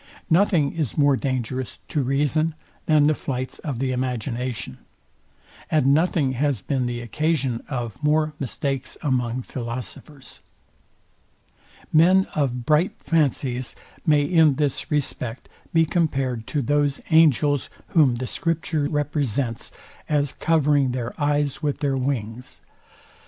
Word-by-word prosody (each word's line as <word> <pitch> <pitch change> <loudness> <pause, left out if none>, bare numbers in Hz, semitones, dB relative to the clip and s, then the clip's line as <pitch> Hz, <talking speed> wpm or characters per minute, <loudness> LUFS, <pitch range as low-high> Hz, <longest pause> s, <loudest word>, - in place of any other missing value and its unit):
Nothing 165 -4 +3
is 155 -8 -3
more 145 -2 +4
dangerous 130 -3 -3
to 150 - 0
reason 150 +4 +1 0.3
than 150 -2 +5
the 155 - +4
flights 130 -3 -4
of 140 -6 -4
the 130 +1 -1
imagination, 125 -1 -3 0.9
and 140 -3 +3
nothing 160 -3 +2
has 135 -1 0
been 125 +5 -1
the 120 0 -3
occasion 135 0 -1
of 120 -3 -4
more 155 +1 +2
mistakes 135 0 -3
among 125 -3 0
philosophers. 130 +4 -7 1.5
Men 185 +5 +5
of 125 -5 -1
bright 155 +6 +3
fancies 135 -5 0 0.3
may 150 -3 +4
in 155 -2 +4
this 145 -1 -1
respect 130 -5 -2 0.2
be 165 0 +4
compared 135 -9 -1
to 145 -3 -1
those 145 +1 +1
angels, 150 -3 +4 0.2
whom 145 -7 +4
the 125 +2 -3
scripture 155 0 -1
represents 140 -6 -1 0.4
as 145 -2 +1
covering 145 -5 +2
their 125 -1 -3
eyes 145 -1 0
with 145 -2 -1
their 140 -2 0
wings. 125 -3 -3
140 Hz, 120 wpm, -23 LUFS, 125-150 Hz, 1.5 s, than